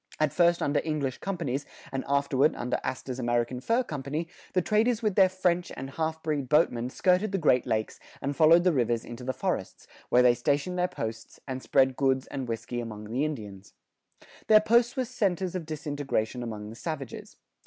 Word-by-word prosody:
At 155 Hz, -2 st, +2 dB
first 175 Hz, -1 st, +3 dB
under 145 Hz, +1 st, +1 dB
English 150 Hz, -5 st, -2 dB
companies, 160 Hz, -8 st, -2 dB, 0.3 s
and 135 Hz, 0 st, -2 dB
afterward 140 Hz, +1 st, +2 dB
under 125 Hz, +1 st, -2 dB
Astor's 130 Hz, 0 st, -4 dB
American 120 Hz, 0 st, 0 dB
Fur 230 Hz, -, +2 dB
Company, 150 Hz, -, -4 dB, 0.3 s
the 185 Hz, -, +3 dB
traders 225 Hz, +3 st, +2 dB
with 210 Hz, -2 st, +2 dB
their 190 Hz, 0 st, +5 dB
French 180 Hz, -1 st, 0 dB
and 135 Hz, +1 st, -6 dB
half 160 Hz, +2 st, -3 dB
breed 145 Hz, -5 st, -2 dB
boatmen 125 Hz, -6 st, +2 dB
skirted 185 Hz, +8 st, +2 dB
the 195 Hz, -, 0 dB
Great 130 Hz, -8 st, +3 dB
Lakes 110 Hz, 0 st, -1 dB, 0.2 s
and 140 Hz, 0 st, -3 dB
followed 165 Hz, +3 st, +6 dB
the 180 Hz, -2 st, +3 dB
rivers 120 Hz, -3 st, 0 dB
into 120 Hz, +1 st, -8 dB
the 130 Hz, -, -1 dB
forests, -, -, -3 dB, 0.2 s
where 125 Hz, -, +5 dB
they 125 Hz, -1 st, +6 dB
stationed 145 Hz, +9 st, 0 dB
their 180 Hz, -, +2 dB
posts 110 Hz, -7 st, -6 dB
and 130 Hz, -1 st, -4 dB
spread 130 Hz, -1 st, +2 dB
goods 135 Hz, -1 st, +2 dB
and 135 Hz, -3 st, -5 dB
whiskey 115 Hz, +1 st, -4 dB
among 105 Hz, -2 st, -7 dB
the 130 Hz, +5 st, 0 dB
Indians. 105 Hz, -10 st, -6 dB, 0.7 s
Their 215 Hz, -1 st, +8 dB
posts 235 Hz, +4 st, +3 dB
were 260 Hz, -, +1 dB
centers 190 Hz, -7 st, -1 dB
of 175 Hz, -4 st, -4 dB
disintegration 145 Hz, -6 st, -2 dB
among 110 Hz, -3 st, -6 dB
the -, -, -10 dB
savages. 140 Hz, -2 st, -6 dB
140 Hz, 185 wpm, -28 LUFS, 125-175 Hz, 0.7 s, Their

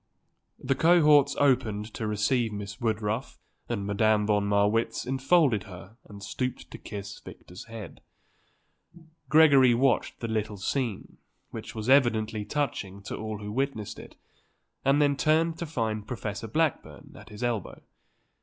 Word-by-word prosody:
The 135 Hz, -, -1 dB
cohorts 150 Hz, -2 st, +5 dB
opened 115 Hz, -6 st, +1 dB
to 110 Hz, -, -4 dB
receive 105 Hz, +3 st, 0 dB
Miss 100 Hz, -1 st, -7 dB
Woodruff 110 Hz, +2 st, -2 dB, 0.3 s
and 105 Hz, -4 st, -2 dB
Madame 105 Hz, +1 st, +2 dB
von 105 Hz, -1 st, +1 dB
Marwitz 105 Hz, +3 st, +1 dB
enfolded 135 Hz, -, +2 dB
her 95 Hz, +2 st, -12 dB
and 100 Hz, -1 st, -11 dB
stooped 125 Hz, +5 st, -4 dB
to -, -, -9 dB
kiss 100 Hz, -1 st, -8 dB
Victor's 90 Hz, +1 st, -12 dB
head. 115 Hz, -2 st, -10 dB, 1.3 s
Gregory 140 Hz, -6 st, +6 dB
watched 130 Hz, 0 st, +1 dB
the 115 Hz, -, -4 dB
little 110 Hz, -2 st, -2 dB
scene, 115 Hz, +1 st, -3 dB, 0.3 s
which -, -, -8 dB
was 110 Hz, 0 st, -5 dB
evidently 115 Hz, -5 st, +3 dB
touching 100 Hz, -7 st, -3 dB
to -, -, -5 dB
all 110 Hz, -1 st, -5 dB
who 105 Hz, 0 st, -7 dB
witnessed 125 Hz, -3 st, -3 dB
it, -, -, -12 dB, 0.7 s
and 135 Hz, +2 st, +3 dB
then 145 Hz, -1 st, +3 dB
turned 160 Hz, +3 st, +1 dB
to 170 Hz, -, -4 dB
find 110 Hz, -7 st, -3 dB
Professor 110 Hz, -2 st, -5 dB
Blackburn 155 Hz, +7 st, -2 dB
at -, -, -13 dB
his 105 Hz, +3 st, -8 dB
elbow. 115 Hz, -5 st, -2 dB
115 Hz, 140 wpm, -27 LUFS, 105-135 Hz, 1.3 s, Gregory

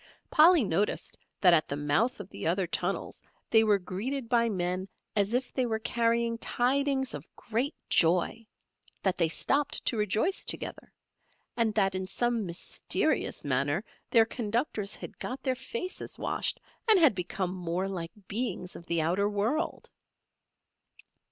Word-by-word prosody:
Polly 330 Hz, -1 st, +7 dB
noticed 200 Hz, +1 st, -1 dB, 0.2 s
that 180 Hz, -3 st, +7 dB
at 155 Hz, -3 st, +4 dB
the 140 Hz, -, -3 dB
mouth 145 Hz, -, +1 dB
of 200 Hz, -, -7 dB
the -, -, -4 dB
other 180 Hz, +3 st, +1 dB
tunnels 170 Hz, -, -3 dB, 0.3 s
they 225 Hz, -1 st, +6 dB
were 210 Hz, -2 st, +4 dB
greeted 230 Hz, +8 st, -4 dB
by 235 Hz, -1 st, +3 dB
men 185 Hz, -1 st, -1 dB, 0.3 s
as 205 Hz, +2 st, +2 dB
if 250 Hz, 0 st, -1 dB
they 255 Hz, -2 st, +1 dB
were 220 Hz, -1 st, 0 dB
carrying 230 Hz, 0 st, 0 dB
tidings 265 Hz, +2 st, +1 dB
of -, -, -7 dB
great 240 Hz, +6 st, -2 dB
joy; 180 Hz, +7 st, +2 dB, 0.6 s
that 190 Hz, -2 st, +2 dB
they 170 Hz, -, +3 dB
stopped 280 Hz, -, 0 dB
to 235 Hz, -, +1 dB
rejoice 215 Hz, -, +1 dB
together, -, -, -3 dB, 0.6 s
and 230 Hz, -3 st, +1 dB
that 195 Hz, -3 st, +3 dB
in 185 Hz, 0 st, -3 dB
some 235 Hz, -1 st, 0 dB
mysterious 170 Hz, 0 st, -1 dB
manner 145 Hz, +6 st, +1 dB, 0.3 s
their 225 Hz, -1 st, +6 dB
conductors 220 Hz, -2 st, -2 dB
had -, -, -10 dB
got 255 Hz, +2 st, -5 dB
their 260 Hz, -, +1 dB
faces 260 Hz, +7 st, -5 dB
washed, -, -, -1 dB, 0.3 s
and 430 Hz, -, +8 dB
had 315 Hz, -9 st, +6 dB
become 180 Hz, 0 st, -3 dB
more 180 Hz, +1 st, -2 dB
like 170 Hz, -4 st, -4 dB, 0.2 s
beings 210 Hz, -4 st, -2 dB
of 170 Hz, -, -11 dB
the 170 Hz, -2 st, +1 dB
outer 190 Hz, +6 st, +1 dB
world. 220 Hz, +11 st, -1 dB
215 Hz, 150 wpm, -29 LUFS, 180-245 Hz, 0.6 s, and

